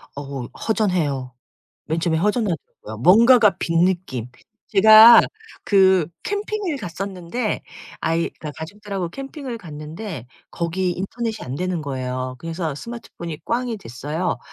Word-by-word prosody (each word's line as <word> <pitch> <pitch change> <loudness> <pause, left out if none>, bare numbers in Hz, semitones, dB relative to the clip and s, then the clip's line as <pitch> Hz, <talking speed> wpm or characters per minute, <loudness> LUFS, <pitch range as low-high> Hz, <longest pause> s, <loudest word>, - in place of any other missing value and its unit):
어 140 -1 -6 0.3
허전해요. 165 - 0 0.5
맨 160 +2 -2
처음에 165 -1 +1
허전하더라고요. 185 - -2
뭔가가 220 - +6
빈 165 0 +2
느낌. 170 -11 -2 0.4
제가 220 +3 +9 0.4
그 190 -4 +4 0.2
캠핑을 410 -5 -2
갔었는데 195 +3 -4 0.4
아이 165 +1 0
그 150 - -5
가족들하고 195 +1 -5
캠핑을 270 - -7
갔는데 155 - -8 0.2
거기 180 +2 -1
인터넷이 220 +4 -4
안 125 - -5
되는 180 +2 -2
거예요. 130 -2 -4
그래서 165 -1 -4
스마트폰이 170 -4 -8
꽝이 240 -1 -1
됐어요. 155 - -3
180 Hz, 295 characters per minute, -22 LUFS, 155-220 Hz, 0.5 s, 제가